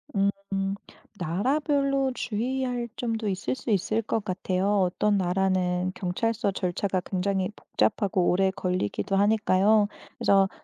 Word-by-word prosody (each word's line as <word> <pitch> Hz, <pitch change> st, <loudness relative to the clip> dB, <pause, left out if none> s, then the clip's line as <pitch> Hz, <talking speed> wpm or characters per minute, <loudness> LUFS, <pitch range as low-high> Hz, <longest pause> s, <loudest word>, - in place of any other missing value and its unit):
음. 195 Hz, 0 st, 0 dB, 0.4 s
나라별로 275 Hz, -, +1 dB
주의할 245 Hz, +1 st, -2 dB
점도 225 Hz, -3 st, -2 dB
있을 190 Hz, +6 st, -2 dB
수 260 Hz, -, -7 dB
있을 210 Hz, +3 st, +1 dB
것 220 Hz, -1 st, -2 dB
같아요. 185 Hz, 0 st, -1 dB
어떤 200 Hz, +3 st, +1 dB
나라는 185 Hz, -1 st, +1 dB
경찰서 200 Hz, +3 st, -1 dB
절차가 185 Hz, 0 st, -1 dB
굉장히 190 Hz, 0 st, -1 dB
복잡하고 195 Hz, -4 st, +1 dB
오래 190 Hz, +1 st, +3 dB
걸리기도 185 Hz, -, -2 dB
하니까요. 205 Hz, 0 st, +4 dB, 0.3 s
그래서 195 Hz, -1 st, +4 dB
195 Hz, 280 characters per minute, -26 LUFS, 185-220 Hz, 0.4 s, 하니까요